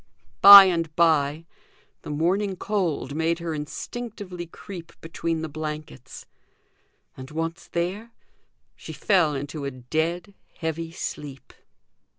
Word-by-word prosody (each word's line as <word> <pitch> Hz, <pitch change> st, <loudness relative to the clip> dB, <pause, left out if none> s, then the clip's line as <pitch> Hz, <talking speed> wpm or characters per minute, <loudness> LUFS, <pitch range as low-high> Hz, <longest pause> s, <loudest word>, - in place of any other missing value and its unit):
By 200 Hz, 0 st, +13 dB
and 165 Hz, -4 st, -1 dB
by 160 Hz, -2 st, +2 dB, 0.6 s
the -, -, -10 dB
morning 185 Hz, +6 st, 0 dB
cold 180 Hz, -9 st, -2 dB
made 160 Hz, +2 st, 0 dB
her 170 Hz, -1 st, -4 dB
instinctively 180 Hz, +3 st, -7 dB
creep 170 Hz, -1 st, -11 dB
between 165 Hz, 0 st, -4 dB
the -, -, -3 dB
blankets; 150 Hz, -4 st, -8 dB, 0.9 s
and, 130 Hz, 0 st, -10 dB
once 165 Hz, +2 st, -5 dB
there, 185 Hz, +7 st, -3 dB, 0.7 s
she -, -, -10 dB
fell 175 Hz, -7 st, +2 dB
into 145 Hz, +2 st, -6 dB
a 140 Hz, -, -2 dB
dead 160 Hz, +9 st, -3 dB, 0.2 s
heavy 165 Hz, -1 st, -4 dB
sleep. 145 Hz, -4 st, -7 dB
165 Hz, 115 wpm, -24 LUFS, 150-180 Hz, 0.9 s, By